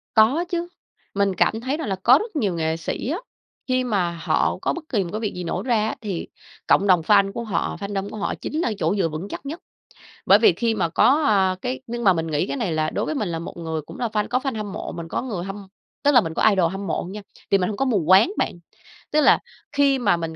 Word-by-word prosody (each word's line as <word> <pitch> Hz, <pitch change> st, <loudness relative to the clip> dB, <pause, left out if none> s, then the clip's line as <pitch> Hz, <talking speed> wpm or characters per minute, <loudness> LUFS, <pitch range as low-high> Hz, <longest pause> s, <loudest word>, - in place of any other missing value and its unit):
Có 245 Hz, +10 st, +4 dB
chứ, 345 Hz, -1 st, -2 dB, 0.5 s
mình 200 Hz, -1 st, +1 dB
cảm 220 Hz, +5 st, +1 dB
thấy 265 Hz, +4 st, -2 dB
rằng 320 Hz, -7 st, -4 dB
là 195 Hz, -, -1 dB
có 255 Hz, +3 st, +7 dB
rất 430 Hz, +2 st, -6 dB
nhiều 210 Hz, -, 0 dB
nghệ 160 Hz, 0 st, -1 dB
sĩ 165 Hz, +8 st, -4 dB
á, 320 Hz, -, -1 dB, 0.5 s
khi 255 Hz, -1 st, +1 dB
mà 200 Hz, -8 st, 0 dB
họ 165 Hz, -, +1 dB
có -, -, 0 dB
bất 340 Hz, -, -6 dB
kỳ 210 Hz, -7 st, +1 dB
một 175 Hz, -, -6 dB
cái 215 Hz, -, -2 dB
việc 215 Hz, -2 st, -3 dB
gì 180 Hz, -, -4 dB
nổ 175 Hz, +2 st, -3 dB
ra 220 Hz, -3 st, +1 dB
á, -, -, -3 dB
thì 200 Hz, -6 st, -4 dB, 0.4 s
cộng 200 Hz, -, +4 dB
đồng 180 Hz, -3 st, +5 dB
fan 195 Hz, +3 st, +4 dB
của 235 Hz, +4 st, -5 dB
họ, 210 Hz, -7 st, -2 dB
fandom 200 Hz, 0 st, -3 dB
của -, -, -8 dB
họ 205 Hz, -, -2 dB
chính 310 Hz, -, -4 dB
là 240 Hz, -, 0 dB
chỗ 170 Hz, +3 st, +1 dB
dựa 190 Hz, -5 st, +1 dB
vững 155 Hz, +5 st, -5 dB
chắc -, -, -7 dB
nhất. 310 Hz, +5 st, -5 dB, 0.7 s
Bởi -, -, +7 dB
vì 430 Hz, -, +6 dB
khi 230 Hz, -2 st, 0 dB
mà 190 Hz, -, 0 dB
có, 255 Hz, -, +3 dB
à, 190 Hz, -3 st, +3 dB
cái 255 Hz, +1 st, -3 dB
nhưng 235 Hz, 0 st, -4 dB
mà 195 Hz, -, +6 dB
mình 165 Hz, -2 st, -2 dB
nghĩ 155 Hz, +2 st, 0 dB
cái -, -, -3 dB
này 225 Hz, -10 st, -1 dB
là 155 Hz, 0 st, 0 dB
đối -, -, -2 dB
với -, -, -2 dB
mình 215 Hz, -9 st, -1 dB
là 165 Hz, -1 st, -3 dB
một 170 Hz, -, -8 dB
người 160 Hz, -2 st, -3 dB
cũng -, -, -12 dB
là 240 Hz, -, -1 dB
fan 210 Hz, -1 st, -1 dB
có 245 Hz, -, +1 dB
fan 260 Hz, -2 st, -3 dB
hâm 210 Hz, -2 st, -4 dB
mộ, -, -, -5 dB
mình 170 Hz, -1 st, -7 dB
có -, -, -2 dB
người 210 Hz, -9 st, -4 dB
hâm 195 Hz, +1 st, -7 dB, 0.4 s
tức 290 Hz, -, +4 dB
là 250 Hz, -, +7 dB
mình 165 Hz, -6 st, -5 dB
có -, -, 0 dB
idol 185 Hz, -4 st, +2 dB
hâm 195 Hz, +1 st, -5 dB
mộ -, -, -1 dB
nha, 210 Hz, +2 st, -7 dB, 0.3 s
thì 195 Hz, -, +5 dB
mình 180 Hz, -, 0 dB
hông 210 Hz, -, -3 dB
có 270 Hz, -, +1 dB
mù 215 Hz, -10 st, +1 dB
quáng 190 Hz, -, +6 dB
bạn. -, -, -1 dB, 0.5 s
Tức 305 Hz, -, +3 dB
là 275 Hz, -, +6 dB, 0.3 s
khi 280 Hz, -2 st, +3 dB
mà 200 Hz, -7 st, +2 dB
mình 165 Hz, -1 st, -5 dB
205 Hz, 275 wpm, -23 LUFS, 180-250 Hz, 0.7 s, có